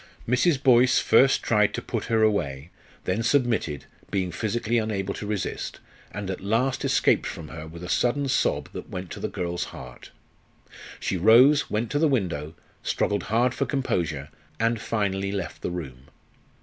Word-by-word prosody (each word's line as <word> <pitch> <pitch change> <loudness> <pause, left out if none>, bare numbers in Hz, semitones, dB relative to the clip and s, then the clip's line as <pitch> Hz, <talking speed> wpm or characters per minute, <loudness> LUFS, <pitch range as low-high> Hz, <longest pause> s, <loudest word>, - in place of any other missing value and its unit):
Mrs. 130 +4 +2
Boyce 125 -2 +5
first 130 +4 +4
tried 105 -2 +2
to - - -3
put - - -3
her 110 -1 +2
away, 80 -8 0 0.3
then 95 +5 -1
submitted, 115 - +1 0.2
being 95 -3 -1
physically 115 +5 -1
unable 100 -3 -2
to 105 - -6
resist, 105 -2 -3 0.3
and 100 -1 -4
at 95 - -6
last 115 +7 0
escaped - - +2
from 80 -2 -7
her 80 0 -8
with 85 +2 -10
a - - -5
sudden 140 +8 +1
sob 130 - 0
that - - -7
went 90 -1 -6
to - - -6
the - - -2
girl's 85 -1 -3
heart. 65 -1 -11 0.9
She 95 - -1
rose, 125 - +6
went 110 +2 -2
to 145 - +1
the 160 - +4
window, 85 - -1 0.3
struggled 100 - -1
hard 120 +3 +2
for - - -1
composure, 80 - -1 0.3
and 115 0 +1
finally 100 -3 -1
left 95 -3 -5
the - - -2
room. 70 -7 -7
105 Hz, 165 wpm, -25 LUFS, 90-120 Hz, 0.9 s, rose